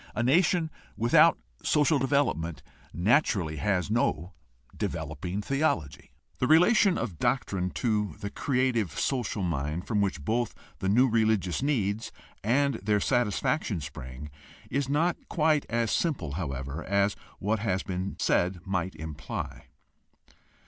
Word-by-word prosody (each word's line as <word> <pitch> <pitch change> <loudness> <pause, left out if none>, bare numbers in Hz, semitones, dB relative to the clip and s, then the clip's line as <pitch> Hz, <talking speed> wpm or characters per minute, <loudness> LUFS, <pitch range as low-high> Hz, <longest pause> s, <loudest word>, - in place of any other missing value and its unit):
A 120 - 0
nation 160 +4 +3 0.3
without 115 +4 +5 0.2
social 150 -1 +3
development 130 - 0 0.3
natu 115 - +3
rally 80 -5 -3
has 95 +4 0
no 95 -6 0 0.4
developing 90 +7 -3
theology. 135 - -1 0.3
The 125 - +1
relation 180 - +5
of 105 -8 -4
doctrine 95 -8 0 0.2
to 105 -7 +1
the 100 - -5
creative 125 - 0
social 120 -6 -1
mind 80 0 -2
from 105 -3 0
which 90 -7 -1
both 120 +3 0 0.2
the 95 - -1
new 125 +6 +5
religious 110 -6 +1
needs 110 -7 0 0.3
and 140 +6 +2
their 105 +1 +2
satisfaction 120 - 0
spring 70 -1 -8 0.4
is 135 +1 0
not 165 +5 +2
quite 155 -3 +2
as 115 -2 0
simple, 130 - 0
however, 70 -1 -4
as 100 +1 +1 0.2
what 105 +2 0
has 95 -3 -1
been 95 +1 -3
said 90 +1 +1
might 95 -2 -2
imply. 80 -1 -6
105 Hz, 130 wpm, -28 LUFS, 90-130 Hz, 0.4 s, without